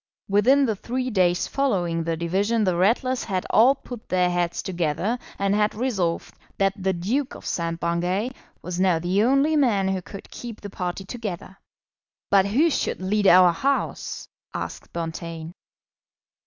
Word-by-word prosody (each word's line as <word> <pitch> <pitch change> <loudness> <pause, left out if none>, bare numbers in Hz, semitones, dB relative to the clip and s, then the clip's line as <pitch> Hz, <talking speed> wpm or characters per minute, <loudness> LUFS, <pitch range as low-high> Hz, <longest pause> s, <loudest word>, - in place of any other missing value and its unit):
Within 250 +8 +4
the 220 -4 0
three 250 +5 -3
days 180 -4 +2
following 180 -12 0
the 165 0 -2
division 200 +7 +1
the 185 -3 +2
Ratlers 240 +8 +1
had 185 -3 -2
all 250 +5 +6
put 245 -4 -10
their 180 -1 +2
heads 175 -1 -1
together 180 +5 -1 0.2
and 200 0 +1
had 210 0 +1
resolved 205 -8 -1 0.2
that 195 0 +2
the 190 -2 -1
Duke 220 +11 -2
of - - -12
St. 165 -1 -2
Bungay 175 +7 -1 0.3
was 180 +1 -4
now 185 -3 +3
the 180 +4 +1
only 275 +6 +3
man 215 -10 +2
who 190 -1 -1
could 195 +2 -11
keep 235 -3 -8
the 205 - -8
party 180 +1 -4
together. 195 -4 -6 0.8
"But 195 -1 +5
who 290 +11 +3
should - - -1
lead 200 +2 +1
our 180 -1 +7
House?" 275 +11 -2 0.3
asked - - -6
Bonteen. 165 0 -5
195 Hz, 155 wpm, -24 LUFS, 175-230 Hz, 0.8 s, our